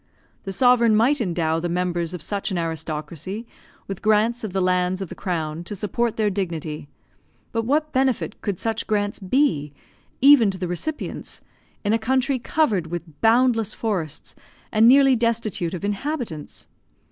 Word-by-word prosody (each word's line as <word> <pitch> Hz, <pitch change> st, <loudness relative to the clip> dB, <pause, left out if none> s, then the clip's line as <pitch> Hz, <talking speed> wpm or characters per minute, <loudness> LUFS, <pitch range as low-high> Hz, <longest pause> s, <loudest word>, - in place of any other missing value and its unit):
The 195 Hz, -, -3 dB
sovereign 235 Hz, +1 st, +4 dB
might 250 Hz, +6 st, +3 dB
endow 165 Hz, -5 st, 0 dB
the 175 Hz, +1 st, -2 dB
members 175 Hz, -1 st, -1 dB
of 180 Hz, -, -5 dB
such 200 Hz, 0 st, -2 dB
an 190 Hz, -, -2 dB
aristocracy 165 Hz, -, -4 dB, 0.4 s
with 195 Hz, -2 st, -6 dB
grants 220 Hz, +3 st, +2 dB
of 215 Hz, -, -3 dB
the 190 Hz, -, -1 dB
lands 180 Hz, 0 st, +1 dB
of 190 Hz, -4 st, -5 dB
the -, -, -6 dB
crown 165 Hz, -3 st, -3 dB
to 205 Hz, -, -5 dB
support 230 Hz, +3 st, -1 dB
their 215 Hz, -2 st, +2 dB
dignity, 160 Hz, -6 st, -4 dB, 0.6 s
but 225 Hz, -1 st, -1 dB
what 300 Hz, +4 st, 0 dB
benefit 260 Hz, -2 st, 0 dB
could 200 Hz, -4 st, -3 dB
such 225 Hz, -1 st, -2 dB
grants 205 Hz, -1 st, -1 dB
be, 190 Hz, -, +1 dB, 0.5 s
even 270 Hz, -5 st, +7 dB
to 190 Hz, -, -4 dB
the 180 Hz, -1 st, -3 dB
recipients, 235 Hz, -, -4 dB, 0.4 s
in 205 Hz, +1 st, +1 dB
a 225 Hz, -, +2 dB
country 260 Hz, +3 st, +1 dB
covered 230 Hz, -, +1 dB
with 165 Hz, -3 st, -7 dB
boundless 225 Hz, -1 st, +3 dB
forests 180 Hz, -10 st, -3 dB, 0.4 s
and 220 Hz, +1 st, +5 dB
nearly 270 Hz, +1 st, +6 dB
destitute 225 Hz, -7 st, -1 dB
of 180 Hz, -, -5 dB
inhabitants? 205 Hz, -, -4 dB
205 Hz, 160 wpm, -23 LUFS, 175-235 Hz, 0.6 s, even